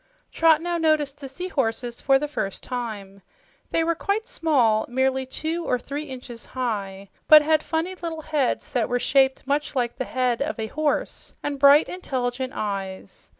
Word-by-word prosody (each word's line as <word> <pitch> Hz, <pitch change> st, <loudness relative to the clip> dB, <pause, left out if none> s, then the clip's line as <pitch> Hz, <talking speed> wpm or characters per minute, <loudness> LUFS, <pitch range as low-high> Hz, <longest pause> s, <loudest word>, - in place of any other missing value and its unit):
Trot 325 Hz, -1 st, +4 dB
now 345 Hz, -1 st, -1 dB
noticed 300 Hz, -3 st, +1 dB
the 270 Hz, -, -7 dB
seahorses 260 Hz, -7 st, -2 dB
for 270 Hz, 0 st, +4 dB
the 295 Hz, +2 st, -2 dB
first 195 Hz, -9 st, -4 dB
time. 210 Hz, -6 st, -5 dB, 0.5 s
They 330 Hz, -, +1 dB
were 335 Hz, +1 st, +1 dB
quite 405 Hz, +6 st, -1 dB
small 250 Hz, -, +2 dB
merely 265 Hz, +1 st, 0 dB
two 320 Hz, +5 st, -3 dB
or 250 Hz, -, +1 dB
three 285 Hz, +5 st, -5 dB
inches 250 Hz, -4 st, -8 dB
high 200 Hz, -5 st, -3 dB, 0.2 s
but 305 Hz, -1 st, +9 dB
had 310 Hz, 0 st, +3 dB
funny 325 Hz, +4 st, -2 dB
little 335 Hz, -3 st, -5 dB
heads 295 Hz, -5 st, -1 dB
that 240 Hz, -3 st, 0 dB
were 245 Hz, -, +1 dB
shaped 265 Hz, +1 st, +2 dB
much 285 Hz, +1 st, -1 dB
like 240 Hz, -2 st, -1 dB
the 260 Hz, -, -2 dB
head 250 Hz, -1 st, 0 dB
of 300 Hz, 0 st, -2 dB
a 220 Hz, -, -2 dB
horse, 310 Hz, 0 st, -1 dB
and 285 Hz, -1 st, -3 dB
bright, 285 Hz, +2 st, +7 dB
intelligent 260 Hz, -6 st, -3 dB
eyes. 195 Hz, -2 st, -5 dB
270 Hz, 170 wpm, -24 LUFS, 245-310 Hz, 0.5 s, but